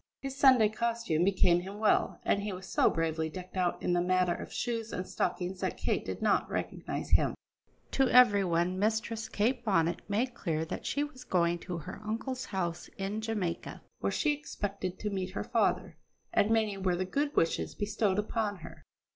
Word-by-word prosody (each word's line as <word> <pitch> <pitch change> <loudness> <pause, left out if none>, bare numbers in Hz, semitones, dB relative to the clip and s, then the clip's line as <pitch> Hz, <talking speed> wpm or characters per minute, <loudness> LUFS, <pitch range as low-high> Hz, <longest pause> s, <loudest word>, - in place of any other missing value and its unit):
His 270 -1 -5
Sunday 260 -6 +6
costume 230 -7 0
became 180 -2 +4
him 195 +3 -7
well, 215 0 +2
and 200 - +2
he 205 0 -3
was 185 0 -7
so - - +3
bravely 160 -1 -1
decked 185 +3 -9
out 180 -2 0
in 180 - +1
the 175 - +3
matter 180 0 +2
of - - -7
shoes 230 -2 -2
and 180 - -3
stockings 180 +1 -2
that - - -2
Kate - - 0
did - - -5
not - - +2
recognise - - -4
him. - - +3 0.6
To 270 -2 +3
every 225 -6 +7
one 175 +1 +1
Mistress 220 +1 -1
Kate 240 +4 0
Bonnet 170 -6 +1
made 235 +5 0
clear 160 -8 -2
that - - -5
she 285 - 0
was 290 -3 -8
going 175 -1 +1
to 175 0 -5
her 170 +5 -8
uncle's 240 +4 -3
house 175 -4 -3
in 195 +3 -2
Jamaica, 205 -7 -3 0.2
where - - 0
she 305 - +2
expected 200 -10 -4
to 210 - -3
meet 190 -1 -2
her - - -1
father; 185 -8 0 0.4
and 205 - +3
many 220 -3 +2
were 185 -2 +1
the 185 +1 -1
good 285 +10 -1
wishes 165 - +1
bestowed 205 -1 0
upon 210 0 -1
her. - - -11
200 Hz, 190 wpm, -31 LUFS, 180-225 Hz, 0.6 s, every